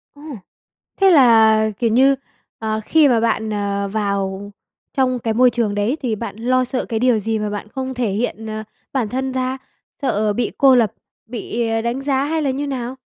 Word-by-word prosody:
Ôi! 290 -4 -9 0.6
Thế 390 - +7
là, 220 -7 +5
kiểu 235 - +2
như, 265 +4 +4 0.4
ờ, 220 -1 -2
khi 315 -2 +4
mà 240 -4 +3
bạn, 225 -1 0
ờ, 200 -1 -2
vào 200 -1 -2 0.4
trong 255 -2 +1
cái 225 -1 -1
môi 250 +3 +5
trường 230 -4 -1
đấy 210 +8 0
thì 235 -5 -1
bạn 230 0 -6
lo 255 +3 +1
sợ 255 +1 -3
cái 225 -2 -2
điều 245 -2 +3
gì 220 +1 -2
mà 210 0 -2
bạn 205 0 -5
không 260 +2 -4
thể 245 -5 -1
hiện, 220 +1 -3
ờ, 215 0 -5 0.3
bản 240 -6 0
thân 265 +1 -2
ra? 260 0 -2 0.4
Sợ 215 -6 0
bị 235 +1 -1
cô 270 -2 +6
lập, 230 -4 +2 0.3
bị, 235 0 -3
à, 225 0 0
đánh 235 +4 -2
giá 275 -1 0
hay 315 +2 -1
là 285 - 0
như 285 +2 -3
nào? 255 -2 -4
235 Hz, 200 wpm, -19 LUFS, 215-260 Hz, 0.6 s, Thế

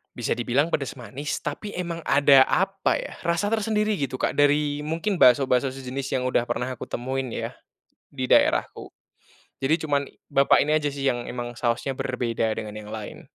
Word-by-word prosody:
Bisa - - -1
dibilang 130 +6 +1
pedas 140 -5 -2
manis, 135 +4 -5
tapi 210 -1 -5
emang 170 -2 -3
ada, 140 -1 +6
apa 195 +1 +1
ya, - - -8
rasa 170 +5 +1
tersendiri 215 -1 0
gitu, 135 -4 -3
Kak, - - -1
dari, 145 0 +2
mungkin 170 +5 -1
bakso-bakso 130 0 +4
sejenis, 135 +1 -5
yang - - -3
udah 120 - +1
pernah 125 +1 -2
aku 130 -2 -6
temuin, 130 +2 -3
ya, - - -3 0.6
di 130 -2 -4
daerahku. - - +2 0.7
Jadi, 135 +4 +2
cuman 140 -2 0 0.2
bapak 140 -1 +4
ini 150 - -1
aja 150 - -3
sih, 140 -1 -3
yang 120 -3 0
emang 120 -1 -6
sausnya 125 +2 -1
berbeda 115 -3 -1
dengan 105 -1 -6
yang 105 0 -8
lain. 110 -2 -8
135 Hz, 170 wpm, -25 LUFS, 125-150 Hz, 0.7 s, ada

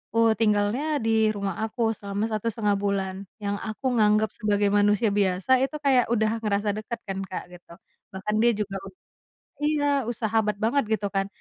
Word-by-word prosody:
eee, 230 -1 +5
tinggalnya 210 +4 +2 0.2
di 220 -1 +3
rumah 200 -3 -3
aku 225 0 0
selama 200 +1 -3
satu 215 +1 -2
setengah 210 -2 0
bulan, 195 -2 -1 0.3
yang 200 0 -1
aku 215 +5 -7
nganggep 215 +1 +3
sebagai 205 -1 +1
manusia 205 +1 +3
biasa 200 +5 +2
itu 285 +3 -2
kayak 265 -4 +3
udah 220 0 +1
ngerasa 205 0 0
deket 225 +2 -5
kan, 195 0 -3
Kak, 185 -1 -5
gitu. 175 -1 -14 0.4
Bahkan 210 +3 -2
dia 240 - +5
juga 200 -2 -3
ud 190 - -13 0.7
iya, 290 -4 +1
e - - 0
sahabat 220 -2 0
banget, 260 +4 +2
gitu 205 -1 -3
kan. 195 0 +1
210 Hz, 175 wpm, -25 LUFS, 200-225 Hz, 0.7 s, eee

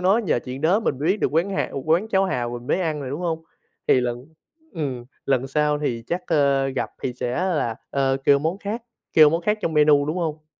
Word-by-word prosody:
nó, 190 +4 +4
nhờ 200 - +1
chuyện 130 +1 -6
đó 175 +8 +3
mình 135 - -1
mới 150 - -2
biết 195 +3 +1
được - - 0
quán 170 +6 +1
hà 195 - -1
quán 170 +7 +2
cháo 195 -2 +2
hàu 125 -10 -1
mình 120 - -14
mới 185 - +1
ăn 160 -4 -1
rồi, 135 -2 -5
đúng 145 +5 -4
không? 165 -2 -2 0.5
Thì 130 - +5
lần 120 +1 -3 0.5
ừm, 135 -7 -4 0.2
lần 135 -1 +1
sau 150 +2 +1
thì 120 -6 -2
chắc, 180 +1 -2
ờ, 140 -4 +2
gặp 135 -1 -3
thì 130 - -1
sẽ 125 0 -3
là, 165 -11 0
ơ, 135 -1 +1
kêu 140 -1 +6
món 160 +6 -2
khác 210 +4 -4 0.3
kêu 155 -2 +7
món 165 +2 0
khác 210 +4 +1
trong 165 - -1
menu, 150 -1 +5
đúng 155 - -2
hông? 155 -3 -3
150 Hz, 240 wpm, -23 LUFS, 135-175 Hz, 0.5 s, kêu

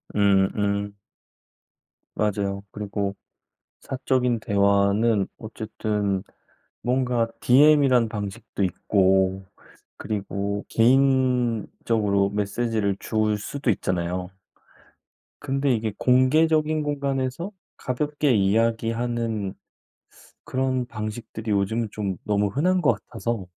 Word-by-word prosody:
음. 100 -2 +4
음. 100 0 -1 1.2
맞아요. 100 -2 -1
그리고 100 -1 -3 0.7
사적인 130 -2 0
대화는 100 +1 +2
어쨌든 105 -3 -3 0.6
뭔가 125 -2 +1
DM이란 135 -3 +5
방식도 105 0 -5
있고 95 +1 +2 0.5
그리고 100 -1 -3
개인적으로 115 -5 +2
메시지를 105 0 -1
줄 110 -1 0
수도 135 +5 -2
있잖아요. 90 -2 -2 1.1
근데 135 0 0
이게 110 -2 -2
공개적인 155 +4 +3
공간에서 140 +3 -2 0.3
가볍게 145 +2 0
이야기하는 115 0 0 0.9
그런 130 -1 -1
방식들이 110 0 -6
요즘은 105 +3 0
좀 100 -4 -3
너무 105 -1 +1
흔한 180 - +1
것 150 - +4
같아서 115 -5 -4
110 Hz, 215 characters per minute, -24 LUFS, 100-130 Hz, 1.2 s, DM이란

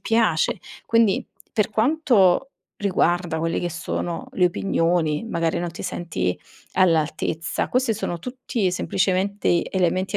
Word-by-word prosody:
piace. 220 -9 +2 0.3
Quindi, 230 -4 +3 0.3
per 210 -3 +1
quanto 240 - +3 0.3
riguarda 175 -4 +1
quelle 165 +1 -1
che 175 - -2
sono 170 +1 -4
le 180 -1 +3
opinioni, 170 -2 0
magari 165 -4 0
non 175 0 -3
ti 170 - -8
senti 90 - -2 0.4
all'altezza, 165 -1 +1
queste 255 -2 +1
sono 175 -4 -3
tutti 245 -2 -2
semplicemente 190 +1 0
elementi 185 +2 0
180 Hz, 120 wpm, -23 LUFS, 170-210 Hz, 0.4 s, Quindi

